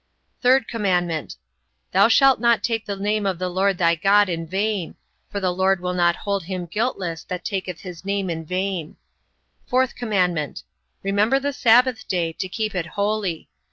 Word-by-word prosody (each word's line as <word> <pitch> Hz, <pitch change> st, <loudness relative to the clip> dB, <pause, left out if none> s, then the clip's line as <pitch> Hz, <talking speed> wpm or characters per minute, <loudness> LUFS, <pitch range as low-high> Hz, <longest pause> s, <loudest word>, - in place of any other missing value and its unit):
3rd 255 Hz, -1 st, +4 dB
commandment: 180 Hz, -7 st, -1 dB, 0.6 s
Thou 195 Hz, +3 st, +5 dB
shalt 270 Hz, +3 st, +5 dB
not 235 Hz, -1 st, +3 dB
take 225 Hz, -2 st, -1 dB
the 200 Hz, -, -2 dB
name 205 Hz, +1 st, -1 dB
of 190 Hz, -2 st, -1 dB
the 185 Hz, +1 st, -2 dB
LORD 190 Hz, +1 st, +1 dB
thy 170 Hz, -1 st, +3 dB
God 200 Hz, +4 st, +4 dB
in 165 Hz, -1 st, -3 dB
vain; 195 Hz, 0 st, -2 dB, 0.3 s
for 200 Hz, -, -3 dB
the 185 Hz, -2 st, 0 dB
LORD 190 Hz, +1 st, +2 dB
will 180 Hz, 0 st, -2 dB
not 175 Hz, -1 st, +3 dB
hold 200 Hz, -4 st, -3 dB
him 185 Hz, -1 st, -4 dB
guiltless 180 Hz, -4 st, -2 dB
that 180 Hz, -1 st, -5 dB
taketh 185 Hz, -4 st, -4 dB
his 180 Hz, -3 st, -9 dB
name 200 Hz, 0 st, -1 dB
in 165 Hz, -2 st, -3 dB
vain. 185 Hz, -1 st, -3 dB, 0.7 s
4th 255 Hz, 0 st, +2 dB
commandment: 180 Hz, -, -1 dB, 0.4 s
Remember 205 Hz, +7 st, +2 dB
the 285 Hz, +1 st, -2 dB
sabbath 245 Hz, -1 st, +3 dB
day, 170 Hz, -3 st, -1 dB
to 185 Hz, -, -5 dB
keep 215 Hz, +2 st, -2 dB
it 180 Hz, -3 st, -2 dB
holy. 200 Hz, -4 st, -2 dB
195 Hz, 170 wpm, -22 LUFS, 175-215 Hz, 0.7 s, Thou